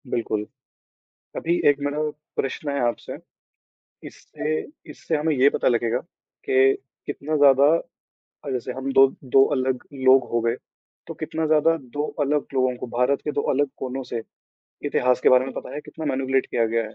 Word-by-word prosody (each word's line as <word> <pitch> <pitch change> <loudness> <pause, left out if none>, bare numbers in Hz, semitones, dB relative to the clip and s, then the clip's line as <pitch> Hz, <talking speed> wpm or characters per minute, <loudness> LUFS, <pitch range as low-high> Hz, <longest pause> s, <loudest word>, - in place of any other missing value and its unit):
बिल्कुल, 110 -3 -2 0.9
अभी 170 +1 0
1 145 -1 +3
मेरा 145 +1 -2 0.4
प्रश्न 135 +2 -3
है 140 - -1
आपसे। 120 - -5 0.9
इससे 155 +1 -4 0.3
इससे 160 - -3
हमें 155 +1 0
ये 135 +2 +5
पता - - -1
लगेगा 120 0 +1 0.5
कि 405 0 +4 0.3
कितना 155 +2 -3
ज़्यादा 140 -1 +6 0.8
अ, - - -4
जैसे 125 -4 -3
हम 135 +1 -4
2- 135 0 +8 0.2
2 135 +1 +5
अलग 130 -2 -1
लोग 130 -1 +5
हो 120 - +2
गए 115 +1 0 0.5
तो - - -6
कितना 160 0 -3
ज़्यादा 155 +1 +4 0.2
2 145 - 0 0.2
अलग 145 +1 +1
लोगों 130 -1 +1
को - - -6
भारत 125 +3 +2
के 150 - -2
2 145 - -1
अलग 145 +1 +1
कोनों 130 +1 -4
से, 120 -2 -5 0.6
इतिहास 125 0 +1
के - - +4
बारे 130 0 +5
में 135 - -6
पता - - -7
है, 150 - -4
कितना 160 - -9
मैनिपुलटे 135 -1 0
किया 115 - +1
गया 115 +1 0
है। 110 - -10
135 Hz, 175 wpm, -23 LUFS, 125-145 Hz, 0.9 s, 2